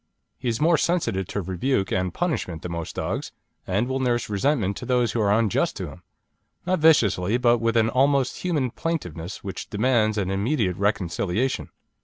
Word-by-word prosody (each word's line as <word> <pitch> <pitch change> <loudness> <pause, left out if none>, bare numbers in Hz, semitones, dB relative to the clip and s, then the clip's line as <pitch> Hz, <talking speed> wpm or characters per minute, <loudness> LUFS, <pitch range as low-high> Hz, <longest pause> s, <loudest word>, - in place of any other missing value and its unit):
He - - -4
is 115 - -1
more 165 +1 +4
sensitive 115 - 0
to 105 - -3
rebuke 95 +4 -1
and 90 -1 0
punishment 120 - -2
than 90 - -5
most 85 -1 -5
dogs, - - -3 0.4
and 100 +6 +1
will 130 +1 -1
nurse 120 -4 0
resentment 100 -2 +1
to - - -6
those 125 -3 +2
who 115 - -1
are 100 -1 +2
unjust 105 -2 +2
to - - -4
him; - - -13 0.6
not 185 -1 +1
viciously, 115 - +4
but 120 -1 +3
with 115 +1 +1
an 110 -1 +4
almost 135 +1 +2
human 150 -9 -1
plaintiveness 90 - -4
which 95 - -6
demands 110 -1 +2
an 95 -2 -1
immediate 100 - 0
reconciliation. 100 +4 -1
115 Hz, 175 wpm, -24 LUFS, 95-130 Hz, 0.6 s, more